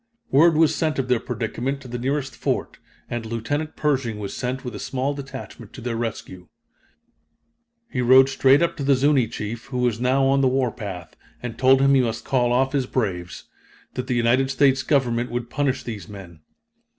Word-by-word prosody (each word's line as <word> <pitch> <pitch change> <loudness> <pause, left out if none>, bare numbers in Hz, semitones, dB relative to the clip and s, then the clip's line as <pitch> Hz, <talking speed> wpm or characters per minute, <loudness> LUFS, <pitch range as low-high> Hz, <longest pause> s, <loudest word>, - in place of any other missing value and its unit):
Word 160 +4 +5
was 160 -1 +4
sent 155 -2 -1
of 130 -1 -2
their 125 -2 +3
predicament 120 +4 -3
to 135 - -12
the 120 0 -5
nearest 135 +2 -2
fort, - - -2 0.3
and 120 -1 -4
Lieutenant 115 +8 -3
Pershing 135 -7 0
was 100 -2 -5
sent 130 +1 -4
with 125 - -5
a 105 - -6
small 135 +2 -2
detachment 140 -1 -9
to 130 - -10
their 120 -1 -3
rescue. 100 -6 -5 1.4
He 125 - -3
rode 130 +2 +7
straight 135 +3 +4
up 170 - 0
to 140 - -4
the 140 0 +4
Zuni 135 -2 +3
chief, 110 +1 -6
who 125 - -5
was 120 -2 0
now 130 +2 +2
on 135 +1 +3
the 135 - +4
warpath, 110 -10 -3 0.3
and 120 -2 -5
told 130 +2 +4
him 140 0 +4
he 135 - +5
must 115 -2 -3
call 120 -2 +1
off 130 +2 +2
his 135 -3 0
braves 90 -9 -3 0.5
that 125 0 -4
the 125 - 0
United 120 +3 +2
States 135 -1 +3
Government 125 -4 +1
would 120 0 -4
punish 135 -3 -1
these 105 -7 -7
men. 95 -5 -11
125 Hz, 190 wpm, -23 LUFS, 115-135 Hz, 1.4 s, rode